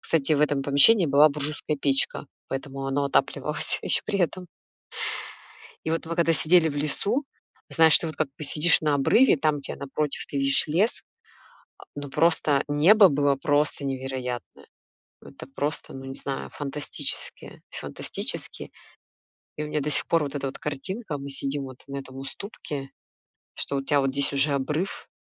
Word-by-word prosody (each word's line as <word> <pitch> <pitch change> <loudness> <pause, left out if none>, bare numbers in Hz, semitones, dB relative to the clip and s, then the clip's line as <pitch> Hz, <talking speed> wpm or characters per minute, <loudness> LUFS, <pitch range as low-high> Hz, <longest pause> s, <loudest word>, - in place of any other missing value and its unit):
Кстати, 155 -1 +1
в 145 - +2
этом 145 -2 +1
помещении 145 +8 +5
была 145 +1 +5
буржуйская 150 0 -3
печка, 140 +1 0 0.2
поэтому 135 0 -5
оно 140 +1 0
отапливалась 140 - -1
ещё - - +3
при 200 - -1
этом. 180 0 -1 1.4
И 160 - -2
вот 165 0 -2
мы, 165 +1 -4
когда 170 -1 +3
сидели 165 +1 +4
в 145 - -5
лесу, 200 - 0 0.4
знаешь, 160 -1 +6
ты - - -4
вот, 155 -2 -6
как 155 -1 -1
ты 135 - -44
посидишь 155 +3 +4
на 150 -2 +1
обрыве, 170 - +4
там, 150 0 0
где 140 - -6
напротив 140 +1 -3
ты - - -7
видишь 135 0 +2
лес, 180 +9 0 0.8
а, - - -14
но 145 -1 -6
просто 150 -2 +2
небо 185 +8 +6
было 145 -1 +2
просто 145 0 0
невероятное. 130 -2 -5 0.6
Это - - -12
просто, 145 +3 -4
ну, 135 0 -8
не 135 0 -7
знаю, 135 -1 -5
фантастически 145 0 -2
фантастически. - - -5 0.9
И 150 - -3
у - - -6
меня 150 0 -1
до 150 +2 -2
сих - - +3
пор 165 -2 +2
вот 140 0 -6
эта 140 -1 -3
вот 135 - -6
картинка: 150 - -5
мы 140 0 -7
сидим 140 0 -1
вот 130 -1 -11
на 140 0 -5
этом 130 -1 -10
уступке, 135 -1 -7 0.6
что 140 - -3
у 135 - -2
тебя 145 0 +2
вот 135 -1 0
здесь 140 +1 +3
уже 140 +1 +4
обрыв, 150 +7 -3
145 Hz, 170 wpm, -25 LUFS, 135-155 Hz, 1.4 s, знаешь